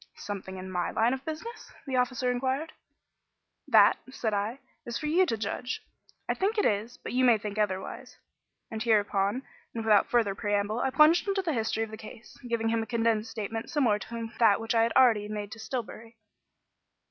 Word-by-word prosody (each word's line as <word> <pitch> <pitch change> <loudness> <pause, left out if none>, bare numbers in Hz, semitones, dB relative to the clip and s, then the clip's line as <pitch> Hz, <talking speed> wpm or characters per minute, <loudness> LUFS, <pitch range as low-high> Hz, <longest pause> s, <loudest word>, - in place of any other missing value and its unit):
"Something 190 -2 -6
in 185 0 -7
my 180 -2 -1
line 230 +3 +2
of 265 0 -5
business?" 320 +10 -7
the 265 -2 -3
officer 250 0 +1
inquired. 265 +5 -2 0.9
"That," - - +6
said 225 -4 -2
I, 205 +5 -1 0.3
"is 235 -1 -4
for 305 - -5
you 350 +5 +3
to 225 - -1
judge. 225 +4 -4 0.4
I - - +1
think 415 +4 -1
it 415 - +2
is, 215 +4 0
but - - -7
you 255 +1 +2
may 240 -3 +6
think 210 0 -5
otherwise"; 190 -3 -3 0.5
and 220 -1 -4
hereupon, 210 +1 +1 0.3
without 220 -3 +3
further 225 -5 +2
preamble, 205 +2 -1
I 265 - +1
plunged 305 +8 +5
into 390 -1 0
the 330 -4 -1
history 225 -2 -1
of 220 - -6
the 220 - -7
case, 225 +1 -12
giving 225 -1 0
him 230 0 +1
a 225 - -5
condensed 225 -2 0
statement 225 0 -5
similar 235 -9 +2
to 230 0 -6
that 220 -4 +5
which 225 +1 -2
I 225 - +4
had 230 +1 +1
already 225 -5 +4
made 210 -1 -5
to 220 - -9
Stillbury. 230 0 -6
225 Hz, 190 wpm, -28 LUFS, 210-255 Hz, 0.9 s, That